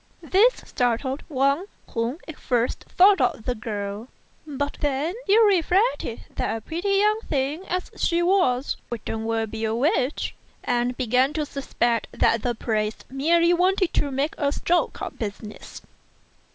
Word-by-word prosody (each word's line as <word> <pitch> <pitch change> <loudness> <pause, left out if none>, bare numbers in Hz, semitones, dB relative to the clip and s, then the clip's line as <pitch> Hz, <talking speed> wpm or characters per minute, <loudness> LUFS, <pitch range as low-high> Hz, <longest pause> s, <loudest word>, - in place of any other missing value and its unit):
This 405 +9 +3
startled 250 +3 -1
Wang, 280 +4 +1 0.3
who 235 +4 -1
at 315 - -9
first 245 -1 -1
thought 390 +2 +5
of 245 -3 0
the 250 - 0
girl; 210 0 -5 0.4
but 285 0 -3
then 290 +4 0
he 405 +2 +5
reflected 405 +1 +2 0.2
that - - -1
a - - -9
pretty 340 - -3
young 425 +2 +3
thing 290 +5 -1
as 365 0 -3
she 340 0 +1
was 325 -9 +2
couldn't 225 -1 -4
well 225 0 0
be 220 +1 -6
a 220 0 0
witch, 260 +2 0 0.3
and 245 0 0
began 255 +3 +2
to 305 -1 -1
suspect 240 -5 -1
that 230 - +2
the 240 0 -1
priest 215 -1 -2
merely 335 +5 +3
wanted 370 +1 +2
to 285 - +1
do 275 +3 0
a 285 -1 +1
stroke 345 +3 0
of - - -6
business. 210 -1 -7
275 Hz, 150 wpm, -24 LUFS, 235-340 Hz, 0.4 s, thought